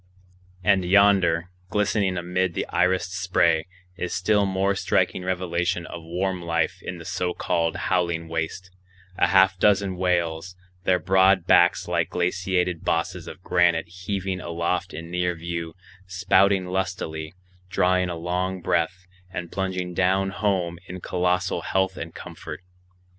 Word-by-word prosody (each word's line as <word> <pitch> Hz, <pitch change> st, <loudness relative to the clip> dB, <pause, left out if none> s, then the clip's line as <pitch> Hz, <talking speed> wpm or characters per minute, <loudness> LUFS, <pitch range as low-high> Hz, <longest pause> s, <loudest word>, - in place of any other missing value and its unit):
And 95 Hz, -3 st, +3 dB
yonder, 90 Hz, -2 st, +4 dB, 0.2 s
glistening 100 Hz, -2 st, +1 dB
amid 90 Hz, 0 st, -1 dB
the -, -, -1 dB
irised 90 Hz, 0 st, +2 dB
spray, 90 Hz, -3 st, +1 dB, 0.3 s
is 90 Hz, -1 st, -3 dB
still 100 Hz, +2 st, +2 dB
more 95 Hz, +1 st, +1 dB
striking 95 Hz, -, 0 dB
revelation 90 Hz, -1 st, -1 dB
of 85 Hz, -, -8 dB
warm 90 Hz, +3 st, -2 dB
life 85 Hz, -2 st, -1 dB
in 90 Hz, -, -6 dB
the 85 Hz, -, -10 dB
so 90 Hz, +1 st, -2 dB
called 85 Hz, -2 st, 0 dB
howling 85 Hz, -2 st, 0 dB
waste,—a 90 Hz, +3 st, -4 dB
half 95 Hz, -1 st, +4 dB
dozen 100 Hz, -2 st, +3 dB
whales, 90 Hz, -1 st, -1 dB, 0.3 s
their 90 Hz, -, +4 dB
broad 95 Hz, -1 st, +3 dB
backs 90 Hz, -1 st, +4 dB
like -, -, 0 dB
glaciated 90 Hz, -1 st, 0 dB
bosses 85 Hz, +1 st, -1 dB
of 90 Hz, -, -10 dB
granite 85 Hz, -2 st, +2 dB
heaving 95 Hz, +1 st, -4 dB
aloft 85 Hz, +1 st, -2 dB
in 85 Hz, +1 st, -8 dB
near 90 Hz, 0 st, 0 dB
view, 85 Hz, -1 st, -5 dB, 0.3 s
spouting 95 Hz, 0 st, +3 dB
lustily, 90 Hz, -3 st, -3 dB, 0.3 s
drawing 90 Hz, 0 st, +2 dB
a 85 Hz, -, -3 dB
long 90 Hz, +3 st, -2 dB
breath, 85 Hz, +2 st, -1 dB, 0.2 s
and 90 Hz, -2 st, -6 dB
plunging 95 Hz, -2 st, -3 dB
down 95 Hz, +2 st, +1 dB
home 95 Hz, -4 st, -1 dB
in 90 Hz, +1 st, -7 dB
colossal 90 Hz, +1 st, 0 dB
health 95 Hz, 0 st, 0 dB
and 80 Hz, -2 st, -7 dB
comfort. 75 Hz, +2 st, -9 dB
90 Hz, 135 wpm, -24 LUFS, 85-95 Hz, 0.3 s, yonder